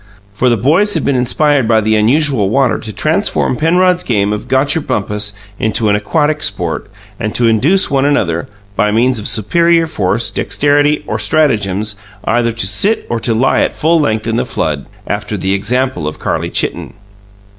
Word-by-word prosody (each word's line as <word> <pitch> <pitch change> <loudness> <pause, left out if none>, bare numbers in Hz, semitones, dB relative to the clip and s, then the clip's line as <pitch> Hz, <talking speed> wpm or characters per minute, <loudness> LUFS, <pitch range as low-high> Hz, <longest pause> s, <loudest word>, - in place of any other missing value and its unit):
For 125 +6 +1
the 120 - +2
boys 165 - +2
had 160 - -1
been 140 - +1
inspired 135 +1 +1
by 110 -1 +4
the 110 0 +1
unusual 120 -1 +2
water 135 +2 +1
to 110 - -7
transform 160 - 0
Penrod's 180 +4 +2
game 105 - 0
of 105 +3 -5
"Gotcher 135 +5 +1
bumpus" 105 -4 -2 0.3
into 110 0 0
an 105 - +3
aquatic 150 +8 0
sport, 100 -2 -2 0.3
and 110 -2 -3
to 120 - +2
induce 145 - +2
one 135 -1 +2
another, 85 - 0 0.3
by 105 - +1
means 120 +3 +1
of 105 - -3
superior 170 - +2
force, 105 - -1
dexterity, 145 +1 +1
or - - -3
stratagems, 105 -9 0 0.3
either 115 0 +1
to 115 -3 -2
sit 195 - 0
or 120 - 0
to 115 0 -1
lie 130 +4 +2
at - - -1
full 165 +2 +2
length 110 -7 0
in 115 0 -1
the - - +1
flood, - - -3 0.2
after - - -3
the 95 +1 -1
example 120 - -1
of 75 - -5
Carlie - - -2
Chitten. - - -3
120 Hz, 175 wpm, -14 LUFS, 105-150 Hz, 0.3 s, by